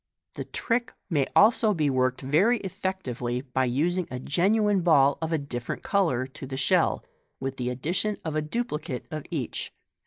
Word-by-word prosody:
The - - -5
trick 240 +1 -1 0.2
may 145 -4 +3
be - - -14
also 220 0 +5
worked 130 -5 +1
very 165 - +3
effectively 185 - -3
by 130 -1 -1
using 165 +8 0
a 125 - -5
genuine 200 - +2
ball 145 -5 +4
of 160 0 -2
a 160 - +2
different 125 -5 -5
colour 165 -11 +1
to 135 +1 -9
the 130 0 -5
shell, 135 - +2 0.3
with 135 0 -4
the 125 -1 -2
addition 175 - -1
of 160 -1 -2
a 155 - +1
duplicate 150 - -3
of 155 -2 -5
each. 145 -8 -3
150 Hz, 165 wpm, -27 LUFS, 130-190 Hz, 0.3 s, also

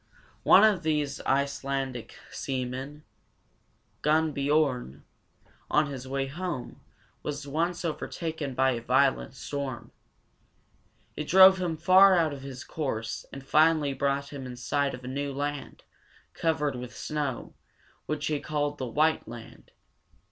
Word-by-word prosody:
One - - +7
of 210 -5 +4
these 150 -3 -1
Ice 140 +1 +1
lan´dic 135 -3 -3 0.2
seamen, 130 +3 -4 1.0
Gunn´biorn, 145 - +1 0.7
on 150 +1 +3
his 130 -1 -7
way 135 0 -1
home, 155 -1 -5 0.4
was 145 -1 -5
once 170 +5 -1
overtaken 160 -3 -4
by 130 +1 +3
a 120 -2 -3
violent 130 +2 +2
storm. 135 -3 -5 1.2
It 150 - -4
drove 190 +1 +8
him 170 -3 -1
far 185 +4 +7
out 160 -3 +2
of 140 - -8
his 135 -2 -8
course, 115 -7 -4
and 135 -1 -9
finally 155 -1 +3
brought 140 +1 -1
him 135 -2 -6
in 125 - -7
sight 140 +3 -1
of 125 - -13
a - - -7
new 140 +2 -3
land, 145 +1 -4 0.5
covered 150 -4 0
with 125 0 -8
snow, 145 -5 -3 0.5
which 150 -1 -2
he 150 -2 0
called 145 -1 -2
the 130 - -3
White 155 +3 +1
Land. 115 0 -11
140 Hz, 135 wpm, -28 LUFS, 130-155 Hz, 1.2 s, drove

